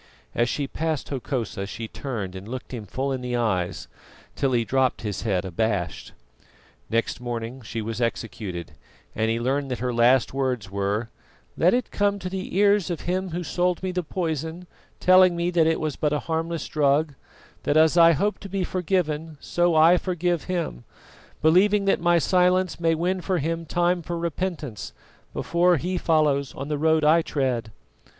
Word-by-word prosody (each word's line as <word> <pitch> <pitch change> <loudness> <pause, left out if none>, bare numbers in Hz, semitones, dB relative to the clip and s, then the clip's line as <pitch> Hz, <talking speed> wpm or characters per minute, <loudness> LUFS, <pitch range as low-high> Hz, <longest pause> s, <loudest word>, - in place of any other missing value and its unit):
As 120 +1 +1
she 145 - -1
passed 160 +2 -3
Hokosa 120 -7 -3
she 110 +2 -6
turned 110 -8 -5
and 95 +2 -8
looked 130 +2 -7
him 110 -4 -6
full 135 +7 -2
in 130 -1 -2
the 125 -1 -3
eyes, 95 -6 -1 0.5
till 135 -2 0
he 120 -2 +2
dropped 130 0 +1
his 105 -3 -4
head 95 -5 0
abashed. 95 -1 -2 0.8
Next 115 +2 0
morning 120 +1 -5
she 115 0 -5
was 115 +2 -4
executed, 105 -7 -3 0.4
and 110 +1 0
he 115 +1 0
learned 135 +3 -1
that 125 - -2
her 125 +1 -2
last 120 +1 +4
words 125 -8 -2
were: 100 +3 -1 0.5
"Let 180 +7 +4
it 250 -2 -2
come 205 0 +1
to 185 -2 -6
the 190 -1 -4
ears 200 -2 +4
of 170 - -3
him 185 +1 -2
who 175 +1 -3
sold 180 +1 0
me 185 - -1
the 180 0 -1
poison, 160 0 -3 0.3
telling 185 -1 +6
me 170 +1 0
that 165 -2 +3
it 160 - +1
was 155 -3 -2
but 150 -1 0
a 150 - 0
harmless 165 -1 -2
drug, 145 0 +2 0.5
that 145 - +1
as 160 +1 +5
I 170 -1 +7
hope 205 +8 0
to 195 - -9
be 190 0 -1
forgiven, 165 -4 -1
so 175 -1 +1
I 165 +3 +6
forgive 175 -2 -1
him, 170 - -3 0.6
believing 195 +6 +4
that 195 - +2
my 175 0 +4
silence 180 +2 +2
may 165 -1 +2
win 180 +3 -1
for 185 +2 0
him 165 +2 -2
time 175 +2 +1
for 170 +1 -4
repentance, 165 - -4 0.4
before 175 0 +2
he 180 +5 -2
follows 145 -5 +1
on 140 +2 -6
the 150 -1 -1
road 160 0 +3
I 160 +3 +5
tread." 125 -8 -2
155 Hz, 180 wpm, -24 LUFS, 120-175 Hz, 0.8 s, I